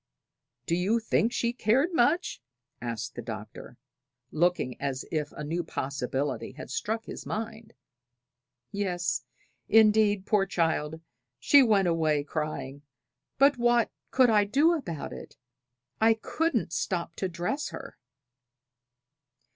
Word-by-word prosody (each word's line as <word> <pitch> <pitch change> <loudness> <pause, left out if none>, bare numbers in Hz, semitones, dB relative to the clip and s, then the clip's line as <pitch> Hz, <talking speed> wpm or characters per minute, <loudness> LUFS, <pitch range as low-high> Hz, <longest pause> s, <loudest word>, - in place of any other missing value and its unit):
"Do 165 - -1
you 190 +7 +2
think 225 0 +1
she 235 0 0
cared 260 - +2
much?" 320 - +1 0.4
asked 115 0 -4
the 120 - -6
Doctor, 110 -2 -8 0.5
looking 170 -6 0
as 135 -1 -3
if 150 -2 -2
a - - -7
new 165 +4 -2
possibility 135 -2 -3
had 145 - -9
struck 220 +1 -2
his - - -7
mind. 225 0 -5 1.0
"Yes, 175 -9 -2 0.4
indeed, 210 -2 +5
poor 205 -2 +2
child, 160 -3 -1 0.4
she 280 - +6
went 210 -7 +4
away 155 -3 +1
crying; 145 -2 -4 0.6
but 275 -1 +4
what 240 -1 +3 0.2
could 255 -3 +4
I 210 -1 +5
do 285 +11 +3
about 175 - -4
it? - - -11 0.6
I 225 0 +5
couldn't 235 - -1
stop 170 -2 -2
to 190 - -2
dress 180 - -3
her." - - -9
185 Hz, 125 wpm, -28 LUFS, 150-225 Hz, 1.0 s, she